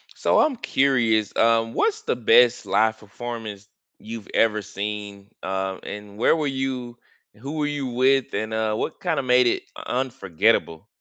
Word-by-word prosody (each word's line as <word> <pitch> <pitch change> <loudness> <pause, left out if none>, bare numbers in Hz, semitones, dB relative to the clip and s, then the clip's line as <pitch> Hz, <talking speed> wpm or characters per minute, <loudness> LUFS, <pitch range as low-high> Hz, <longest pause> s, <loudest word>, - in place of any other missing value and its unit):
So - - +2
I'm 290 -5 +2
curious, 120 - +1
um, 115 0 +2
what's 440 0 0
the - - -1
best 120 +1 +4
live 110 -1 +2
performance 110 -1 -8 0.3
you've 115 -1 -8
ever 105 -2 +2
seen, 100 0 -6
um, 95 0 -3
and 105 -1 -8
where 120 - +4
were 155 -2 -1
you 130 -3 -3 0.4
who 135 +7 -7
were 150 -2 -1
you 145 -2 -3
with, 130 +1 +2
and, 110 0 -2
uh, 110 -1 0
what - - -4
kinda 160 -6 0
made 125 -1 +4
it 120 - +1
u - - -8
unforgettable? 100 -8 0
115 Hz, 160 wpm, -23 LUFS, 105-130 Hz, 0.4 s, best